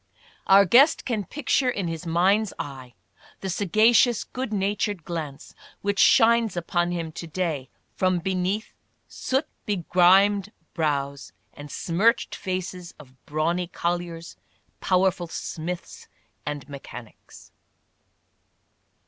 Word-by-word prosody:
Our 195 +1 +7
guest 270 - +5
can 220 -6 -2
picture 270 - 0
in 200 -7 -2
his 165 +1 -5
mind's 190 +5 +2
eye 130 -4 -8 0.5
the 190 - -3
sagacious, 215 +5 +3
good 255 -2 -5
natured 205 -2 -1
glance 155 -5 -6 0.3
which 200 0 -1
shines 230 -4 +5
upon 175 0 0
him 170 -2 -3
to 170 +1 -8
day 160 -5 -3 0.3
from 185 -1 +1
beneath 190 +4 -2 0.3
soot 270 +4 -1 0.2
begrimed 195 +2 +3 0.2
brows 140 -3 -2 0.2
and 145 0 -10
smirched 200 +11 +1
faces 185 -1 -5
of 135 -4 -15
brawny 165 +4 -1
colliers, 170 -1 -4 0.4
powerful 185 -1 +1
smiths 170 +1 -6 0.4
and 145 -3 -4
mechanics. 130 -5 -12
180 Hz, 105 wpm, -25 LUFS, 165-205 Hz, 0.5 s, Our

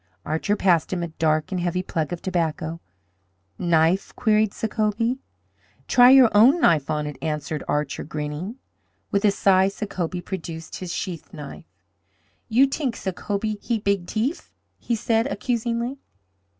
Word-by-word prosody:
Archer 160 +7 0
passed 175 -6 +2
him 180 -2 -1
a 170 - -3
dark 155 0 0
and 185 -2 -1
heavy 180 +1 -1
plug 160 -4 -2
of 175 - -5
tobacco. 165 -2 -2 0.8
"Knife?" 170 +1 +2
queried 215 -3 +2
Sacobie. 225 +3 -1 0.7
"Try 245 0 +7
your 260 -3 +7
own 245 +11 +6
knife 160 - +3
on 150 -1 -1
it," 150 -2 -7
answered 150 -1 -3
Archer, 150 +1 -1
grinning. 150 +7 -5 0.6
With 200 +1 +1
a - - +7
sigh 190 -1 +4
Sacobie 190 -3 -3
produced 165 -3 -6
his 180 -2 -6
sheath 175 -2 -5
knife. 145 -2 -9 0.8
"You 245 +5 +5
t'ink 270 -3 -2
Sacobie 205 +3 -3
heap 225 -3 -2
big 200 -3 0
t'ief," 245 +9 -2 0.3
he 235 - -1
said, 225 +1 +1
accusingly. 235 +3 -2
190 Hz, 140 wpm, -24 LUFS, 160-225 Hz, 0.8 s, Try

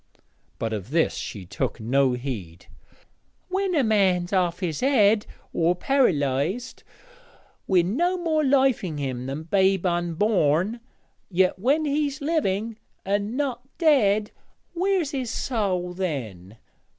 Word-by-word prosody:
But 115 -1 -3
of 105 0 -5
this 160 +3 +2
she 100 -4 -6
took 90 - -3
no 130 +3 +2
heed. 110 -10 -6 0.8
'When 380 -1 0
a 285 - +3
man's 195 -5 +2
off 180 -2 +1
his 170 -5 -2
head 220 -6 +3 0.3
or 170 +2 +2
par'lysed, 180 - 0 0.9
wi' 185 -3 +4
no 340 - 0
more 320 -3 0
life 270 -3 +3
in 160 -5 -4
him 130 -3 -4
than 140 +4 -4
babe 190 +2 +2
unborn 175 +2 +1 0.5
yet 185 0 +2
when 285 +9 +2
he's 290 0 -1
living 230 - -1 0.3
and 205 +4 -1
not 265 -4 -1 0.2
dead 215 - +3 0.4
where's 365 -3 0
his 260 -4 -3
soäl 185 -9 -2
then? 115 - -5
195 Hz, 125 wpm, -24 LUFS, 155-265 Hz, 0.9 s, wi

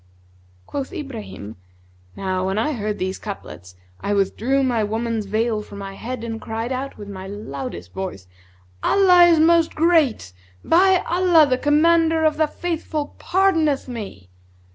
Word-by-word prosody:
Quoth 275 -2 -5
Ibrahim, 230 - -8 0.6
"Now 185 -1 -2
when 190 +2 -1
I 265 +8 0
heard 210 -4 -3
these 185 +1 -3
couplets, 90 - -9 0.2
I 205 - -1
withdrew 240 +7 +1
my 240 -4 +1
woman's 220 0 -2
veil 220 +1 0
from 205 - -11
my 195 -1 -7
head 240 +3 -6
and 225 -1 -5
cried 225 +2 -4
out, 265 +2 -4
with 205 - -9
my 190 -1 -8
loudest 135 - -7
voice, 185 - -6 0.6
'Allah 365 -3 +6
is 335 -2 +4
Most 330 0 +4
Great! 310 - +2 0.3
By 370 +2 +4
Allah, 345 -2 +4
the 255 -1 0
Commander 325 +2 +3
of 310 -1 +2
the 310 -1 +2
Faithful 315 -2 -4
pardoneth 330 -8 +1
me!' 200 - -8
240 Hz, 145 wpm, -21 LUFS, 200-320 Hz, 0.6 s, Allah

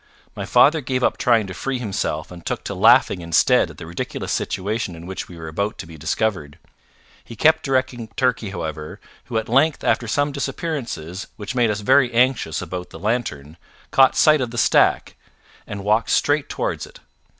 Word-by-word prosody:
My - - -5
father 155 +2 +5
gave 130 -1 -2
up - - +1
trying 115 -4 +3
to 95 - -7
free 135 +8 -3
himself 100 -9 -3
and 85 -1 -11
took - - -3
to - - -4
laughing 90 - +4
instead 85 -1 +3
at - - -13
the - - -8
ridiculous 85 +1 -5
situation 100 -1 -2
in 85 +1 -11
which 95 +1 -6
we 90 - -12
were 80 -1 -8
about 100 +7 -3
to - - -7
be 80 0 -12
discovered. 80 -1 -2 0.7
He 115 - -11
kept 160 +6 +4
directing 130 -4 -1
Turkey, 125 -5 0
however, 80 -4 -6 0.3
who 120 -2 -3
at 110 - -2
length 135 +6 +2
after 115 - +1
some 145 +6 0
disappearances 135 - -4
which 105 +2 -5
made 120 -3 +2
us 105 0 -2
very 130 +3 +4
anxious 120 - +1
about 90 +1 -6
the - - -10
lantern, 85 - -3 0.3
caught 135 -1 +5
sight 155 -2 +5
of 125 - -2
the 120 - -8
stack, - - +2 0.5
and 100 -1 -6
walked 110 +3 +1
straight 145 0 +1
towards - - -3
it. - - -16
110 Hz, 185 wpm, -21 LUFS, 90-130 Hz, 0.7 s, father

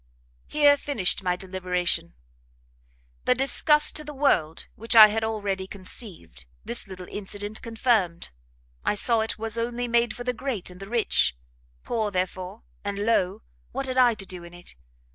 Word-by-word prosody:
"Here 290 -1 +4
finished 225 -13 0
my 180 -1 0
deliberation; 180 -2 -2 1.1
the 250 - +4
disgust 300 +3 +5
to 305 - -7
the 300 -1 -9
world 165 - +1
which 230 +2 -2
I 215 -1 +11
had 220 +1 -2
already 200 -4 -2
conceived, 185 - -5 0.2
this 235 -2 -2
little 185 -1 -9
incident 205 +1 -5
confirmed; 225 - 0 0.5
I - - +1
saw 230 +2 +3
it 220 0 -1
was 225 +1 -3
only 240 +1 -2
made 235 -1 +1
for 245 - -7
the 250 0 -1
great 240 -8 -4
and 180 - -13
the 195 0 -9
rich; 220 - +2 0.5
poor, 220 -3 -1
therefore, 185 +2 -4 0.2
and 200 -1 -3
low, 200 - 0 0.3
what 275 - -3
had 260 0 -1
I 245 -2 +5
to 195 - -8
do 180 -2 -8
in 170 0 -12
it? 175 - -10
215 Hz, 160 wpm, -25 LUFS, 185-240 Hz, 1.1 s, I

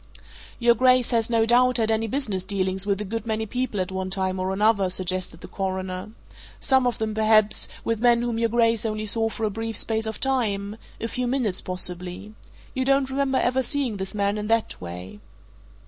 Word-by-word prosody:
"Your 235 -1 +4
Grace 255 +1 +3
has, 230 -1 +1
no 225 -1 +3
doubt, 250 +2 +4
had 225 -1 +1 0.2
business 215 -8 -2
dealings 190 0 0
with 200 -1 +1
a - - -3
good 225 +2 -5
many 220 0 -1
people 245 -1 -3
at 185 0 -2
one 190 0 -3
time 190 -1 -1
or 185 +1 -1
another," 200 -1 +2
suggested 185 -2 -2
the - - -9
Coroner. 190 0 -4 0.5
"Some 265 -2 +3
of 245 - -1
them, 220 -1 -2
perhaps, 215 -1 +3 0.2
with 230 -1 -1
men 240 0 +4
whom 235 -1 -2
your 230 0 +1
Grace 230 -1 +2
only 215 -1 -2
saw 225 +1 0
for 225 - -7
a 215 - +1
brief 225 +2 -4
space 220 0 -1
of 220 - -5
time 215 -6 -1 0.2
a 230 - -2
few 250 +1 -2
minutes, 240 -7 0
possibly. 180 +2 0 0.4
You 260 - -1
don't 275 0 +2
remember 270 -1 0
ever 255 +2 +1
seeing 260 -5 -1
this 190 +2 -3
man 200 0 0
in 210 - -4
that 225 0 0
way?" 90 +3 -8
220 Hz, 195 wpm, -24 LUFS, 190-235 Hz, 0.5 s, Your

